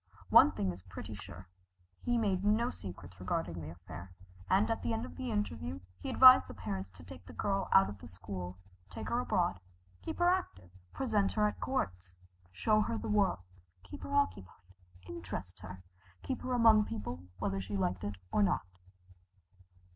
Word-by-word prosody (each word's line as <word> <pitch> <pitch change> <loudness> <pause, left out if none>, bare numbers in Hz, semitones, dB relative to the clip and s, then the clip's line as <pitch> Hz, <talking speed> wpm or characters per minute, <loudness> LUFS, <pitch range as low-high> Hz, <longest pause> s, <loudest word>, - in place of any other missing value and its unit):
One 100 - +8
thing 95 0 -1
is 90 +1 -9
pretty 95 +3 -8
sure, 95 -2 -10 0.5
he 240 0 +1
made 195 -5 +1
no 220 +4 +2
secrets 90 -1 -10
regarding 90 -2 -2
the 80 - -6
affair, 85 +2 -10 0.3
and 195 +3 +4
at 225 - -1
the 230 - -1
end 225 +2 -2
of - - -10
the 255 -1 -4
interview 90 - -2 0.2
he - - -5
advised 255 0 +9
the - - -9
parents 95 -1 -4
to 85 -1 -12
take 90 0 -11
the - - -10
girl 195 -2 -1
out 190 - +7
of 100 -2 -8
school, 90 0 -7 0.3
take 90 - -6
her - - +1
abroad, 95 - +1 0.4
keep - - -5
her 350 - +3
active, 355 - 0 0.2
present 215 -7 +1
her 210 -1 +3
at 210 - -4
courts, 90 - -3 0.4
show 215 - +2
her 225 +2 -1
the - - -5
world, 200 - +2 0.4
keep 100 - -10
her 280 - -4
occupied, 95 - -1 0.4
interest 90 +2 -6
her, 90 0 -9 0.4
keep 260 - -3
her 255 - -2
among 225 -3 +6
people 90 -5 -6
whether 95 +1 -1
she 100 +2 -4
liked 90 0 -1
it 100 0 -3 0.2
or - - +2
not. 100 - +2
100 Hz, 175 wpm, -33 LUFS, -, 0.5 s, advised